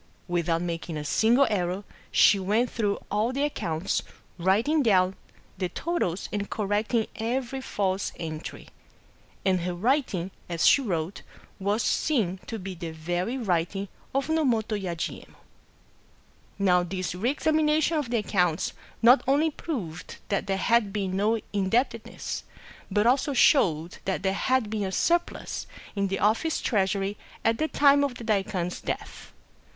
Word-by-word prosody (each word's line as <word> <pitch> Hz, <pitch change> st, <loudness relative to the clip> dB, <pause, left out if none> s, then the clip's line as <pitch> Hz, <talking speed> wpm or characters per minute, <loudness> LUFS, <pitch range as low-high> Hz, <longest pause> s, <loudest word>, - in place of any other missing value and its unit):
Without 170 Hz, -1 st, 0 dB
making 165 Hz, -2 st, -4 dB
a 150 Hz, -, -5 dB
single 235 Hz, -, +4 dB
error, 185 Hz, 0 st, -1 dB, 0.3 s
she 200 Hz, -, +5 dB
went 215 Hz, +6 st, +1 dB
through 205 Hz, -3 st, 0 dB
all 210 Hz, +4 st, +1 dB
the 275 Hz, +2 st, -1 dB
ac 295 Hz, -, +1 dB
counts, 160 Hz, +2 st, -1 dB, 0.4 s
writing 220 Hz, -, +3 dB
down 190 Hz, -6 st, +3 dB, 0.4 s
the 185 Hz, -2 st, -1 dB
totals 195 Hz, -, -2 dB
and 205 Hz, -1 st, -2 dB
correcting 210 Hz, +2 st, 0 dB
every 255 Hz, +3 st, -2 dB
false 195 Hz, -6 st, -1 dB
entry. 160 Hz, -1 st, -6 dB, 0.8 s
And 185 Hz, -2 st, +3 dB
her 175 Hz, 0 st, -2 dB
writing, 205 Hz, -, 0 dB, 0.2 s
as 170 Hz, -1 st, 0 dB
she 280 Hz, -, +6 dB
wrote, 180 Hz, -6 st, -2 dB, 0.4 s
was 205 Hz, +4 st, 0 dB
seen 205 Hz, -, +1 dB
to 225 Hz, -, -4 dB
be 190 Hz, -1 st, -6 dB
the 170 Hz, -1 st, -6 dB
very 175 Hz, +9 st, -2 dB
writing 195 Hz, -2 st, -1 dB, 0.3 s
of 275 Hz, -, +1 dB
Nomoto 250 Hz, -9 st, +1 dB
Yajiye 175 Hz, -5 st, -4 dB
mon. -, -, -22 dB, 1.2 s
Now 180 Hz, -3 st, +4 dB
this 185 Hz, 0 st, -3 dB
reexamination 305 Hz, -, +2 dB
of 295 Hz, -6 st, -1 dB
the 240 Hz, -, +1 dB
accounts 180 Hz, -6 st, +1 dB, 0.3 s
not 245 Hz, +4 st, +8 dB
only 295 Hz, +4 st, +3 dB
proved 195 Hz, -, -5 dB
that 200 Hz, -, 0 dB
there 195 Hz, -1 st, 0 dB
had 230 Hz, 0 st, +2 dB
been 195 Hz, -2 st, -2 dB
no 215 Hz, +3 st, +2 dB
indebtedness, 225 Hz, +4 st, -1 dB, 0.5 s
but 210 Hz, +2 st, +2 dB
also 265 Hz, +4 st, +3 dB
showed 175 Hz, -, +3 dB
that 190 Hz, -, -1 dB
there 190 Hz, -1 st, +2 dB
had 255 Hz, +3 st, +1 dB
been 215 Hz, -1 st, -1 dB
a 190 Hz, -, -3 dB
surplus 340 Hz, -, 0 dB, 0.3 s
in 200 Hz, -1 st, +1 dB
the 195 Hz, 0 st, -1 dB
office 225 Hz, +12 st, +1 dB
treasury 200 Hz, -1 st, 0 dB, 0.3 s
at 225 Hz, 0 st, +2 dB
the 315 Hz, -, +1 dB
time 285 Hz, -2 st, +5 dB
of 275 Hz, -3 st, -1 dB
the 240 Hz, -, -8 dB
daikwan's 195 Hz, -5 st, -1 dB
death. -, -, -5 dB
205 Hz, 145 wpm, -27 LUFS, 185-245 Hz, 1.2 s, not